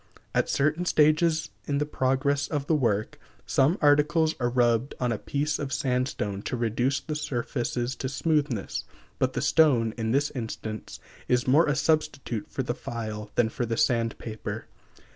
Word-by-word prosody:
At - - +1
certain 155 +5 +1
stages 155 0 +3 0.2
in 140 - 0
the 150 - +1
progress 140 0 0
of 145 -3 -2
the 160 - +1
work, 115 -8 0 0.3
some 145 +8 +3
articles 150 +2 +4
are 120 -1 +1
rubbed 120 +1 +2
on 125 -1 0
a 110 - -2
piece 145 +2 -1
of 140 -2 -4
sandstone 125 -7 -1
to 125 - -3
reduce 120 +4 0
the 155 - -5
surfaces 125 -3 -2
to 130 - -3
smoothness; 140 - -1 0.4
but 130 0 +1
the 125 - -2
stone, 130 -8 +4
in 110 0 -1
this 140 +5 +1
instance, 110 -3 -6 0.3
is 125 +1 +1
more 150 +6 +5
a 145 - +2
substitute 145 -6 0
for - - -3
the - - -2
file 110 -2 -5
than 120 -2 +3
for 120 - -3
the 115 0 -2
sand 115 -2 +1
paper. 110 -2 -6
130 Hz, 165 wpm, -27 LUFS, 115-150 Hz, 0.4 s, more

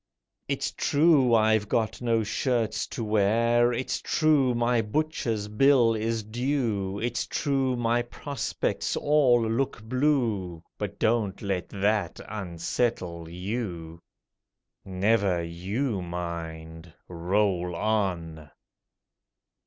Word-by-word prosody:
It's - - -1
true 145 -5 +3
I've 110 -2 +3
got 110 0 0
no 115 -2 +1
shirts 115 +1 -1
to 120 - -5
wear; 115 +3 +3
It's 125 +2 -2
true 145 -6 +2
my 120 0 +2
butcher's 115 -4 -2
bill 120 +1 +4
is 110 0 -1
due; 110 -4 -1
It's 120 +2 -2
true 135 -3 0
my 120 0 +1
prospects 135 +2 -3
all 130 -6 +3
look 115 -1 -1
blue— 115 - 0 0.2
But 100 -1 -4
don't 110 -4 +1
let 95 -3 -2
that 100 -2 0
unsettle 90 -2 -3
you! 90 -3 -5 0.8
Never 95 -2 +1
you 95 +7 -2
mind! 85 -1 -6 0.2
Roll 90 0 0
on! 85 -7 -2
110 Hz, 100 wpm, -27 LUFS, 90-120 Hz, 0.8 s, bill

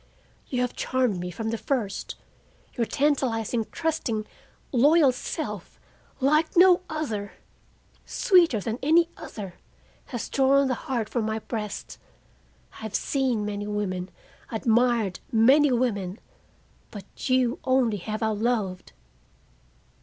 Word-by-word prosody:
"You 250 -2 -1
have 250 - -1
charmed 250 -7 0
me 180 0 -4
from 220 +5 -4
the 230 - -3
first. 220 -8 -2 0.6
Your 230 -2 -1
tantalizing, 245 -6 0
trusting, 285 -10 -2 0.5
loyal 285 +3 +5
self, 250 - -6 0.4
like 305 +5 +2
no 360 0 +7
other, 225 -11 -3 0.7
sweeter 345 - +3
than 225 +4 -4
any 330 +4 +4
other, 195 -5 -8 0.5
has 240 -5 -5
drawn 275 0 +3
the - - +2 0.2
heart 235 -5 0
from 230 -1 -2
my 220 0 -1
breast. 215 -2 -5 0.7
I - - -14
have 220 -2 -6
seen 255 -6 0
many 205 0 -4
women, 190 -3 -3 0.4
admired 230 -3 +1
many 265 +6 +5
women, 210 -6 0 0.7
but 205 +4 -8
you 255 +3 +2
only 255 -5 +2
have 215 +4 -4
I 220 - +2
loved. 210 - -1
235 Hz, 120 wpm, -26 LUFS, 210-270 Hz, 0.7 s, no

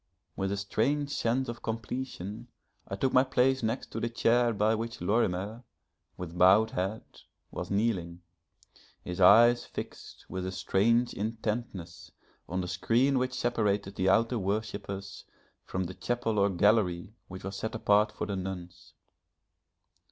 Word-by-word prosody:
With 95 0 -2
a 100 - -1
strange 140 +9 0
sense 130 +1 0
of 120 0 -6
completion 110 -3 -5 0.4
I 95 - -4
took 130 +6 0
my 130 - +6
place 130 0 +2
next 115 +3 -2
to - - -4
the 120 - -1
chair 120 +1 +3
by 105 0 +2
which 115 +2 -4
Lorimer, 100 +3 0 0.5
with 90 -1 -7
bowed 95 +5 +5
head, 95 +4 -2 0.5
was - - -5
kneeling, 95 -5 -1 0.8
his 90 +1 -4
eyes 120 +6 +7
fixed - - -9
with 95 0 -4
a - - -3
strange 115 +6 +2
intentness 110 -5 -4 0.4
on 95 +2 -1
the 90 - -4
screen 120 +9 +2
which 130 0 -1
separated 105 -6 0
the 95 -1 +1
outer 115 +4 +3
worshippers 100 -1 -4 0.4
from 95 - -2
the 90 +1 -5
chapel 115 0 -1
or 100 0 +4
gallery 95 -1 +2
which 95 0 -9
was 95 +1 -5
set 110 - -4
apart 105 -1 +3
for - - -4
the 100 -2 -3
nuns. 90 -2 -7
105 Hz, 145 wpm, -29 LUFS, 95-115 Hz, 0.8 s, eyes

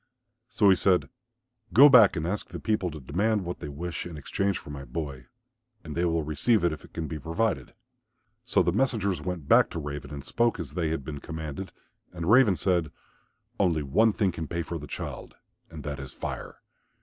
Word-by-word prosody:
So 115 -4 +3
he - - +6
said, 90 0 +2 0.6
"Go 140 +5 +10
back 120 -9 +7
and 80 -2 -2
ask 95 +5 -2
the - - -6
people 105 -5 0
to 75 -1 -8
demand 95 - 0
what 90 - -5
they - - -6
wish 85 +5 -5
in 85 -3 -8
exchange 100 +6 -1
for 75 - -10
my 70 -1 -7
boy 70 -1 -6 0.6
and 80 -2 -7
they 85 +1 +1
will 80 -2 +1
receive 80 - +1
it 85 -2 +2
if 80 - -9
it - - -15
can 80 -1 -4
be 80 0 -5
provided." 95 +9 -2 0.7
So - - +2
the 85 - +2
messengers 100 - 0
went 85 -3 -5
back - - +6
to 85 - -5
Raven 75 -2 -6
and 70 -2 -6
spoke 115 +2 +1
as 75 -5 -6
they 85 -1 -1
had 80 -4 -3
been 75 -1 -5
commanded. 80 +4 -6 0.4
And 85 -2 -5
Raven 115 -5 +6
said, 85 -5 0 0.7
"Only 85 -6 +2
one 110 +12 +3
thing 100 -2 +1
can 80 -2 -5
pay 85 +2 -2
for 85 0 -5
the 75 - -9
child, - - -7 0.3
and 80 -3 -9
that 70 -2 -4
is 70 - -7
Fire. - - -6
85 Hz, 205 wpm, -27 LUFS, 75-100 Hz, 0.7 s, Go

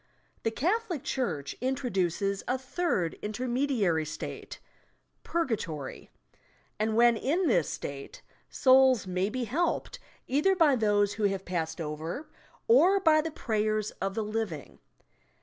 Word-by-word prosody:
The - - +1
Catholic 350 - -1
church 160 - -2
introduces 200 -7 -1
a 255 - +1
third 260 - -2
inter 215 +4 -4
mediary 240 - +1
state, 155 - -7 0.6
Purgatory; 200 - -3 0.7
and 215 0 0
when 235 0 +5
in 315 - 0
this 175 - +2
state, 140 -1 -7 0.3
souls 260 -3 +5
may 185 +1 -1
be 255 +2 -3
helped 305 +10 -1 0.3
either 300 +9 +2
by 315 -6 +4
those 205 -3 +2
who 215 - -1
have 195 -1 -1
passed 165 -2 -3
over 160 - -5 0.4
or 395 -4 +6
by 315 -4 +4
the 325 - -3
prayers 215 -6 -1
of 195 +1 -2
the 220 - -1
living. 210 -8 -4
225 Hz, 130 wpm, -29 LUFS, 190-275 Hz, 0.7 s, or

